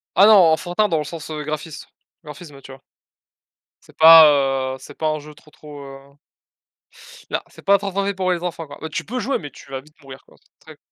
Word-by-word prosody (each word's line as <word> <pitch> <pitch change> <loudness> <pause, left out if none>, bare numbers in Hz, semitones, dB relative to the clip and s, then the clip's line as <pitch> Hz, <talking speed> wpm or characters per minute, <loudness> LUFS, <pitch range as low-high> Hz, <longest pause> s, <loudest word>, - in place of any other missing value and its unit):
Ah 195 - +6
non, 220 - +7 0.2
enfantin 180 +6 0
dans 165 - 0
le 150 - -2
sens, 160 +1 -9
heu, 155 -1 -6
graphis 155 +1 -7 0.4
graphisme, 150 -2 -12
tu 135 - -13
vois? 135 - -14 1.0
C'est - - -22
pas, 160 0 +9 0.5
heu, - - -12
c - - -15
'est - - -14
pas 155 - -3
un 155 0 -2
jeu 150 +1 -13
trop 150 +1 -22
trop, 150 -1 -13
heu 135 0 -11 1.3
non, - - -1
c'est - - -18
trop 200 0 +4
trop 200 0 -6
fait 200 - -2
pour 185 -1 -1
les 175 -2 -2
enfants, 165 -2 -5
quoi. 145 - -14
Ouais, 160 - -6
tu - - -5
peux 250 +4 -5
jouer, 270 +2 -2
mais 145 -4 -10
tu 140 - -17
vas 135 -1 -5
vite 150 +2 -24
mourir 135 -1 -13
quoi. - - -23 0.2
Très - - -16
155 Hz, 230 wpm, -20 LUFS, 145-180 Hz, 1.3 s, pas